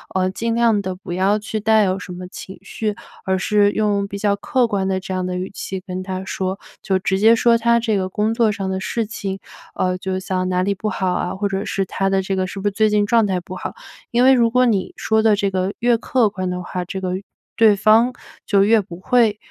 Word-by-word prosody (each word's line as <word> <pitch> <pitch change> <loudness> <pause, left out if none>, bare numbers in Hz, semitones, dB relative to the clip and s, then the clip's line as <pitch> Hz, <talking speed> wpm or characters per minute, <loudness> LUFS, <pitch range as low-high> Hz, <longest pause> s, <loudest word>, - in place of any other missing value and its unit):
呃， 185 0 +1
尽 230 +4 -2
量 230 -3 +3
地 185 -1 -4
不 180 -1 -8
要 190 +3 +2
去 215 +1 -4
带 220 0 +4
有 190 -1 0
什 185 - -9
么 180 0 -7
情 190 +1 -10
绪， 215 -2 -3 0.3
而 190 0 0
是 205 +1 +2
用 205 -2 0
比 200 - -6
较 200 0 +1
客 250 +4 +1
观 195 -3 -1
的 190 -1 0
这 190 0 -6
样 185 0 -1
的 180 - -3
语 185 +1 -4
气 190 -1 -5
跟 185 -1 -6
他 185 0 -5
说， 190 0 -3 0.2
就 190 -2 +1
直 190 +1 -1
接 225 +3 +6
说 235 0 +4
他 235 0 +3
这 225 -2 0
个 185 -1 -2
工 210 +3 0
作 230 -2 +2
上 200 -2 -4
的 190 0 -2
事 225 +4 -2
情， 195 -2 -5 0.4
呃， 185 0 0
就 190 0 -3
像 185 -1 -2
哪 180 0 +1
里 200 +1 +1
不 215 +2 -3
好 185 -2 -1
啊， 180 0 -2
或 200 +2 -1
者 195 0 -2
是 195 -2 -1
他 195 +1 -1
的 195 0 +1
这 195 +1 -2
个 185 0 -1
是 195 - -7
不 200 - -1
是 - - +1
最 215 +2 +2
近 210 -1 +2
状 225 0 +3
态 185 -2 0
不 180 +1 -9
好。 - - -6 0.3
因 240 0 +2
为 265 +1 +7
如 235 -3 +4
果 250 +2 +3
你 205 -6 0
说 220 0 +1
的 220 -1 +4
这 200 -1 -1
个 185 0 -1
越 240 0 +3
客 235 -1 +1
观 185 -2 -3
的 180 0 -4
话， 180 0 -4
这 190 +2 -5
个 185 -1 -2
越 190 - -5 0.3
对 220 -2 +5
方 220 +5 +4 0.3
就 200 -2 +3
越 220 +2 +4
不 185 -4 -7
会， 225 -1 +3
200 Hz, 275 characters per minute, -20 LUFS, 185-220 Hz, 0.4 s, 为